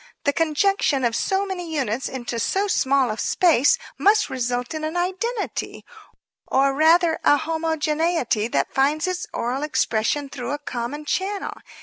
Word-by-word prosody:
The 285 - +1
conjunction 315 -3 +1
of 230 -1 0
so 385 +8 0
many 360 -4 -5
units 260 -3 -1
into 240 -2 -4
so 390 - 0
small 270 - +2
a 215 - -5
space 340 - +3 0.2
must 425 +2 +3
result 245 +1 -2
in 310 0 -4
an 315 +3 -2
identity 385 +6 -3 0.6
or, 275 +1 +3
or - - -5
rather 320 +3 +4
a 290 - +5
homogeneity 320 -5 0
that - - -1
finds 290 +4 +2
its 365 -1 -3
oral 250 +4 -2
expression 285 -1 0
through 255 -2 -5
a - - -1
common 285 +1 -5
channel. 385 +5 -2
300 Hz, 150 wpm, -23 LUFS, 260-350 Hz, 0.6 s, a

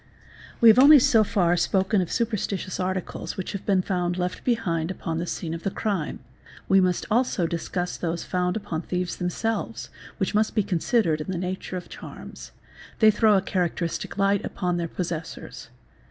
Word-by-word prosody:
We 230 - +9
have - - -4 0.3
so 225 -2 +5
far 190 -4 +1
only 175 - +3
spoken 190 +3 +2
of 175 - -4
superstitious 210 -5 -2
articles 185 0 -3
which 185 - -4
have 200 - -7
been 190 -2 +3
found 180 -2 -1
left 180 0 -3
behind 175 -9 0
upon 165 -3 -3
the 175 - -3
scene 165 -1 -4
of 165 - -5
the 195 - -1
crime, 195 - -3 0.5
we 195 0 +5
must 180 -1 +1
also 230 -6 +2
discuss 175 +2 -3
those 170 -1 -3
found 180 +1 -1
upon 165 -6 -4
thieves 180 0 -3
themselves 220 +6 -3 0.3
which 190 -4 -1
must 215 +1 +1
be 210 - +3
considered 175 -3 +1
in 150 - -6
the 185 - -2
nature 185 +1 -4
of 180 - -8
charms: - - -10 0.5
they 220 -1 +6
throw 210 -1 +4
a 190 - 0
characteristic 175 -3 -2
hght 200 0 +2
upon 180 -2 -2
their 170 -1 -2
possessors. 165 -1 -6
185 Hz, 175 wpm, -25 LUFS, 175-200 Hz, 0.5 s, We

